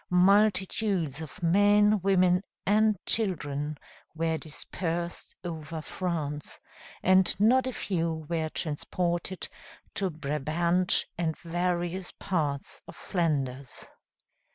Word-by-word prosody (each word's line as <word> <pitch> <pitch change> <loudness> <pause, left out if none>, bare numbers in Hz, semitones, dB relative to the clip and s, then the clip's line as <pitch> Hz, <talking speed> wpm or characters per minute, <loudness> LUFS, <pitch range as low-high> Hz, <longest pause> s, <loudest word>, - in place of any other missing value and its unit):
Multitudes 190 -3 +3
of 160 +1 -9
men, 205 +3 +5
women, 185 -1 +4 0.2
and 215 +1 +4
children 150 -8 0 0.4
were 160 0 0
dispersed 170 +2 -4
over 160 -2 -5
France, 155 -4 -3 0.4
and 185 +1 +5
not 255 +5 +4
a - - -1
few 165 -8 -2
were 160 -1 -1
transported 175 +4 -2 0.5
to 195 -1 0
Brabant 160 +4 0
and 160 -2 0
various 175 +1 -2
parts 150 -7 -2
of - - -10
Flanders. 140 -7 -2
175 Hz, 95 wpm, -28 LUFS, 155-190 Hz, 0.5 s, men